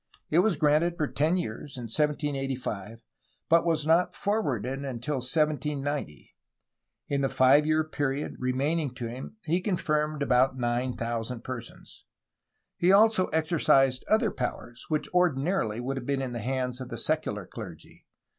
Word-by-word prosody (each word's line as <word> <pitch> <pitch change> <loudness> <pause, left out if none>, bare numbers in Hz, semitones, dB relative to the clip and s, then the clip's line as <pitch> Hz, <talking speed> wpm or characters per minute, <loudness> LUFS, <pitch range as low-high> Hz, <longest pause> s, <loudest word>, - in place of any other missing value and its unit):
It 160 - +5
was 195 0 +3
granted 155 +4 +2
for 155 - +1
ten 155 +5 +1
years 140 -1 -5
in 125 - -6
1785, 135 -5 -2 0.5
but 165 0 +5
was 160 -3 0
not 165 +3 +3
for 210 +2 0
warded 130 - -2
until 135 +2 -3
1790. 145 - -1 0.7
In 140 -1 0
the 135 - +1
five 140 +4 +5
year 155 0 +3
period 145 -2 -2
remaining 135 +2 0
to 120 - -5
him 130 - -8
he 170 +3 +1
confirmed 155 -6 0
about 130 0 +3
9000 120 -1 -2
persons. 120 -2 -9 0.7
He 175 +2 +4
also 210 -1 +5
exercised 145 -5 +2
other 220 -1 +3
powers 120 -3 -5
which 155 -1 0
ordinarily 160 - +1
would 135 +2 -3
have 125 - -6
been 140 -1 0
in 125 -2 -4
the 120 - -3
hands 125 +2 -2
of 125 - -6
the - - -5
secular 105 - -1
clergy. 90 -4 -11
140 Hz, 145 wpm, -28 LUFS, 125-155 Hz, 0.7 s, It